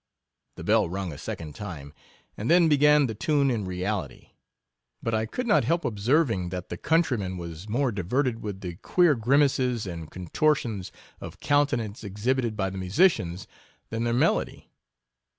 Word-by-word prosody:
The - - -8
bell 105 -1 +3
rung 95 -2 -4
a - - -9
second 75 -3 -6
time 80 -8 -8 0.2
— - - -35
and 110 - -4
then 170 0 +6
began 150 -1 +5
the 115 - -3
tune 140 +3 +1
in 110 -5 -2
reality; 90 +2 -4 0.7
but 115 - -1
I 110 0 0
could 250 - -4
not 210 -3 +4
help 170 +1 0
ob 105 -4 -3
serving, 115 - +2
that 90 0 -6
the 85 - -5
countryman 120 - 0
was 85 +3 -8
more 125 +3 +1
di 100 -3 -3
verted 125 +6 0
with 100 -3 -6
the 85 -2 -6
queer 175 - +3
grimaces 125 -1 +2
and 85 -4 -6
contor 95 - +1
tions 105 -9 -5 0.3
of - - -9
countenance 120 -7 0
exhibited 110 +3 -1
by 95 -2 -1
the 95 - -6
musi 95 - +4
cians, 90 +2 -6 0.5
than 115 0 -2
their 120 - +1
melody. 120 - 0
110 Hz, 175 wpm, -26 LUFS, 95-140 Hz, 0.7 s, then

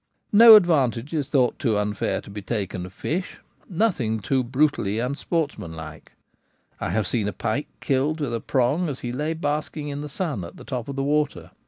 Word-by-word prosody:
No 225 +1 +10
advantage 145 - +3
is 145 -4 -1
thought 130 -4 +1
too 115 -7 +1
unfair 105 0 -1
to - - -13
be 105 +1 -6
taken 100 -4 -3
of - - -13
fish; 180 - -3 0.3
nothing 165 - 0
too 130 +5 0
brutally 130 -5 +1
unsportsmanlike. 115 - -4 0.7
I - - -2
have 110 -2 0
seen 105 +1 -1
a - - -1
pike 135 +7 -2
killed 145 +3 0
with 140 -6 -2
a 115 - -1
prong 140 +7 +1
as 135 - -6
he 120 - -3
lay 150 +6 -2
basking 150 -1 -3
in 145 0 -4
the 150 - -6
sun 145 - -3
at 85 - -10
the - - -11
top 125 -4 -4
of 140 - -5
the 135 - -1
water. 150 +1 -1
135 Hz, 190 wpm, -24 LUFS, 110-150 Hz, 0.7 s, No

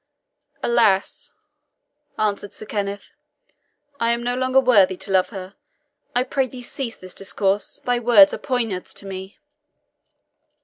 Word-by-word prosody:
"Alas," 220 -5 +2 0.9
answered 205 -2 -1
Sir - - -9
Kenneth, 205 -1 -4 0.9
"I 230 - +1
am 235 0 -3
no 245 +1 0
longer 255 +1 +3
worthy 205 -8 +4
to 195 - -6
love 185 -1 +3
her. 190 -2 -8 0.6
I 245 - +3
pray 265 0 0
thee 250 0 -10
cease 240 -1 -5
this 185 -1 -10
discourse 195 +1 -1
thy 245 -1 +1
words 225 -5 +6
are - - -4
poniards 230 -9 -2
to - - -7
me." 190 +1 -8
215 Hz, 135 wpm, -22 LUFS, 195-245 Hz, 0.9 s, words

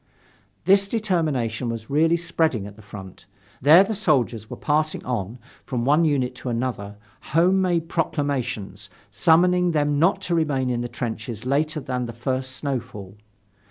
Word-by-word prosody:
This 195 +1 +5
determination 155 - -1
was 115 +1 -6
really 160 +4 +3
spreading 165 -10 0
at 105 0 -10
the 110 - -15
front. 95 -4 -11 0.3
There 155 +8 +8
the 210 +3 -3
soldiers 125 - 0
were - - -7
passing 155 +1 0
on, 115 -2 -3 0.3
from 120 -3 -3
one 150 +5 +4
unit 130 -5 +1
to 125 - -5
another, 115 -4 -3 0.2
home 180 +5 +2
made 175 -3 0
proclamations, 140 - -2 0.2
summoning 180 +1 +3
them 145 -1 +1
not 170 +6 +3
to 175 - -2
remain 140 -6 +1
in 120 -1 -1
the 120 - -4
trenches 115 -2 -5
later 150 +4 0
than 125 -3 -3
the 120 - -7
first 130 +2 -3
snowfall. 110 -9 -5
135 Hz, 155 wpm, -23 LUFS, 120-165 Hz, 0.3 s, There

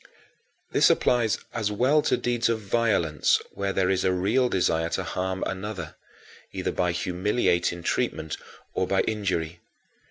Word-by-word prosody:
16. - - -25 0.6
This - - +5
applies 120 -3 +2 0.2
as 110 -2 -1
well 130 +8 +3
to - - +1
deeds 120 -1 0
of 115 -1 0
violence 100 -7 +2
where 100 0 -2
there 95 -1 +1
is 95 -1 +1
a 95 - +3
real 105 +8 +2
desire 80 -4 +1
to 95 - -2
harm 95 +2 -3
another, 95 -4 -5 0.6
either - - -2
by 90 -1 0
humiliating 90 -1 0
treatment 80 -1 -1 0.4
or - - 0
by - - +2
injury. 90 -6 -2
95 Hz, 150 wpm, -26 LUFS, 90-110 Hz, 0.6 s, This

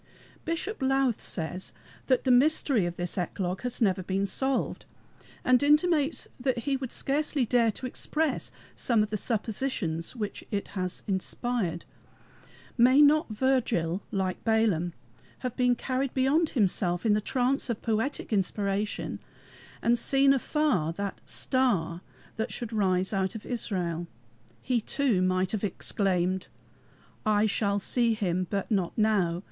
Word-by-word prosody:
Bishop 335 +4 -3
Lowth 270 -3 +2
says 180 +2 -4 0.3
that 255 -2 +3
the 260 - +3
mystery 255 - +3
of 175 - -5
this 175 +1 -3
eclogue 180 +1 -2
has 250 -1 -2
never 190 -3 +2
been 190 +2 -1
solved, 265 +6 -1 0.6
and 255 -1 +5
intimates 300 +1 +3
that 255 -1 0
he 280 -1 +1
would 260 -2 -4
scarcely 285 -1 0
dare 235 -1 +3
to 260 - -7
express 305 +4 -1 0.3
some 230 -4 +2
of 210 - -5
the - - 0
suppositions 210 -5 -2
which 210 -4 -4
it 200 -2 -3
has 185 -2 -4
inspired. 190 -2 -2 0.9
May 255 +4 +6
not 295 0 +5
Virgil, 215 -7 +1
like 190 -2 -2
Balaam, 215 -7 +2 0.5
have 250 -1 -2
been 250 -1 +3
carried 260 +2 -2
beyond 285 +5 +3
himself 180 -3 +1
in 215 - +4
the 210 - +2
trance 255 +4 0
of 235 - -3
poetic 225 +2 -1
inspiration, 200 +1 -1 0.6
and 235 0 +3
seen 275 +2 +4
afar 260 - +1
the 200 +2 -3
"Star" 195 - 0 0.4
that 220 - -2
should 235 -2 -5
arise 190 -2 +1
out 190 +2 0
of 220 - -7
Israel? 175 -8 -2 0.6
He 250 -3 +1
too 245 -5 +1
might 185 0 +1
have 215 -2 -2
exclaimed: 190 -2 0 0.8
"I 215 0 +3
shall 200 -1 +1
see 230 +3 +1
him, 185 -3 -1
but 200 +2 -2
not 190 -2 0
now. 200 -6 +2
220 Hz, 140 wpm, -28 LUFS, 190-260 Hz, 0.9 s, May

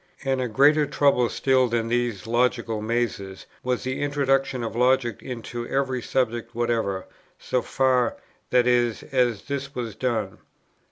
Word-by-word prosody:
And 135 -1 0
a 125 - 0
greater 145 +6 +4
trouble 140 -4 +3
still 130 -1 +2
than 115 -1 -1
these 120 -4 -1
logical 120 -1 0
mazes, 110 -4 -2 0.2
was 125 -1 -1
the 130 +1 -3
introduction 135 -3 +1
of 115 - -4
logic 125 -2 +2
into 120 -1 -6
every 135 -2 -1
subject 120 -2 -1
whatever, 115 -5 -1 0.3
so 125 - -1
far, 130 -1 +1 0.3
that 125 -1 +4
is, 120 -2 +2
as 120 -6 +1
this 140 0 -5
was 115 -3 -4
done. 110 -5 -2
125 Hz, 145 wpm, -24 LUFS, 115-130 Hz, 0.3 s, greater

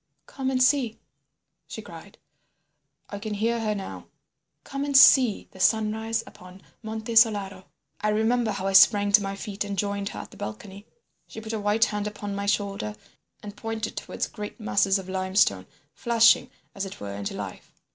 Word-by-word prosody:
"'Come 265 -1 -4
and 255 -1 +2
see,' 255 -4 +2 0.7
she - - -8
cried—I 200 - -15
can 215 0 -4
hear 230 +3 0
her 215 -2 -1
now—'come 275 +6 -9
and 285 -1 +3
see 255 -5 +6
the 190 - -15
sunrise 220 +2 +1
upon 185 +1 -15 0.2
Monte 220 +1 -5
Solaro.' 200 -5 +3 0.4
"I 210 - +1
remember 220 +2 +1
how 195 -2 -3
I 195 - 0
sprang 205 +1 +6
to 205 +1 +6
my 195 0 -4
feet 200 0 -5
and 200 -1 -5
joined 200 0 -2
her - - -8
at - - -13
the - - -14
balcony. 190 - -8 0.4
She - - -9
put 220 0 -7
a 220 - -2
white 210 +2 +2
hand 210 0 -3
upon 205 -1 -6
my 200 0 -4
shoulder 200 - -1 0.5
and 205 -1 -8
pointed 225 +1 -5
towards - - -4
great 210 +3 -8
masses 200 -2 +2
of 190 -1 -8
limestone, 185 - +1 0.3
flushing, 230 -1 +4 0.2
as 195 - -4
it 195 -1 -7
were, 100 -1 -6
into 100 0 -5
life. - - -8
210 Hz, 170 wpm, -25 LUFS, 195-225 Hz, 0.7 s, see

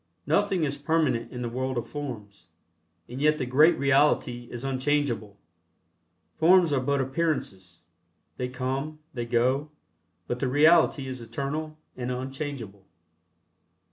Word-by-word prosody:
Nothing 200 -4 +1
is 140 -1 -1
permanent 145 -5 0
in 125 -1 -5
the - - -2
world 130 +2 -3
of 120 - -3
forms, 105 - -7 0.6
and 125 +3 -7
yet 150 +1 +3
the 130 - -2
great 150 +7 +5
Reality 135 -3 +2
is 120 0 -7
unchangeable. 130 -6 -1 1.0
Forms 170 -1 +5
are 135 - +2
but 140 +2 0
appearances 130 - -2 0.6
they 125 - -2
come, 135 +4 -3 0.2
they 120 -3 -4
go, 130 +5 +1 0.6
but 120 - -3
the 135 - 0
Reality 150 +1 +4
is 130 -2 -6
eternal 145 +6 -4 0.2
and 125 -1 -4
unchangeable. 130 -5 -5
135 Hz, 130 wpm, -27 LUFS, 120-150 Hz, 1.0 s, great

